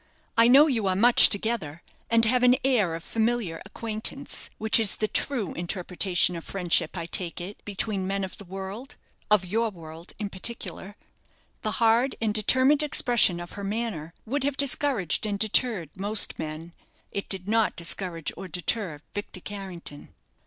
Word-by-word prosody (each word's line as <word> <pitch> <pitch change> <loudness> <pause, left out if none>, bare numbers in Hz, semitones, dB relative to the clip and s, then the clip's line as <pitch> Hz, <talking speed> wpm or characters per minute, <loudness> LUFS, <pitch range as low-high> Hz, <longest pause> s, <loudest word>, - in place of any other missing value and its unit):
I 230 0 +6
know 275 +5 +8
you 235 -9 0
are 185 - +1
much 235 +5 +7
together, 200 -7 -1 0.3
and 230 0 +5
have 250 +2 +2
an 250 0 +5
air 210 -11 +2
of 165 - -8
familiar 225 -7 -1
acquaintance, 225 +6 -5
which 220 +1 +2
is 215 -4 +2
the 215 - -1
true 230 - -1
interpretation 180 0 +1
of 165 - -7
friendship, 180 -2 +1
I 170 - -3
take 170 0 +1
it, 185 +4 -8
between 200 -1 -1
men 195 0 -2
of 190 - -7
the 200 - -10
world 195 +7 -8 0.3
of 210 -3 +4
your 225 +5 0
world 165 -2 -12
in 205 -2 -5
particular." 205 -1 -4 0.7
The 215 - -2
hard 235 +2 +2
and 220 -2 0
determined 260 +7 +4
expression 240 - +3
of 175 0 -8
her 200 - -8
manner 195 -6 -4
would 265 +4 -2
have 280 0 -1
discouraged 260 - +1
and 205 -1 -2
deterred 215 - +1
most 205 +3 0
men. 160 +2 -6 0.4
It 200 - -5
did 190 -1 -5
not 225 0 +1
discourage 170 -1 -2
or 190 - -8
deter 180 -2 -2
Victor 205 -2 -6
Carrington. 185 -7 -7
205 Hz, 165 wpm, -26 LUFS, 180-230 Hz, 0.7 s, know